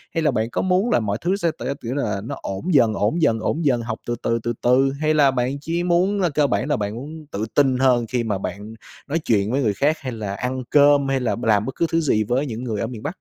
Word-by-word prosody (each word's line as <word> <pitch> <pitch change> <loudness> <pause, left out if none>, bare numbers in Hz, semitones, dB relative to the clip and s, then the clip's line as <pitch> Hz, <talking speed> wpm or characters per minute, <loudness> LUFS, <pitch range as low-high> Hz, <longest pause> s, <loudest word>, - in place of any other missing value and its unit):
Hay 165 - +1
là 150 - +3
bạn 115 -1 -1
có - - -2
muốn 190 +5 +1
là - - +4
mọi 105 -1 -2
thứ 185 +3 +1
sẽ 170 -5 0
t 120 - -10 0.2
kiểu 120 +3 -4
là 105 -8 -1
nó - - -4
ổn 155 - -3
dần, 115 -6 +4
ổn 110 +14 0
dần, 115 -7 +3
ổn 155 +8 -2
dần, 125 -4 +2
học 115 -1 -5
từ 120 - -1
từ, 115 0 +1
từ 120 - -1
từ, 130 +2 +3
hay 155 0 +2
là 145 -3 +4
bạn 130 +2 -1
chỉ 170 +3 -2
muốn 185 +3 +2
cơ 150 -2 +3
bản 100 -3 -1
là - - +2
bạn 105 +1 -3
muốn 150 +5 -8
tự 105 +2 -2
tin 135 -3 +3
hơn 125 -3 +3
khi 125 -2 0
mà 105 -4 -1
bạn 100 +3 -6 0.3
nói 160 +4 -1
chuyện 105 -6 +1
với 140 +2 +1
người 105 -5 +1
khác, 150 +9 +1
hay 130 -2 -5
là 105 -4 -5
ăn 130 +3 -3
cơm, 145 -1 +5
hay 135 -1 +1
là 125 - -1
b 120 - -8
làm 105 -1 +3
bất 130 - -5
cứ 170 - +1
thứ 165 - +2
gì 110 -8 +2
với 125 +7 0
những 120 -1 -5
người 110 -4 -3
ở 115 - -1
miền 115 -3 -8
Bắc? - - -1
125 Hz, 285 wpm, -22 LUFS, 110-150 Hz, 0.3 s, cơm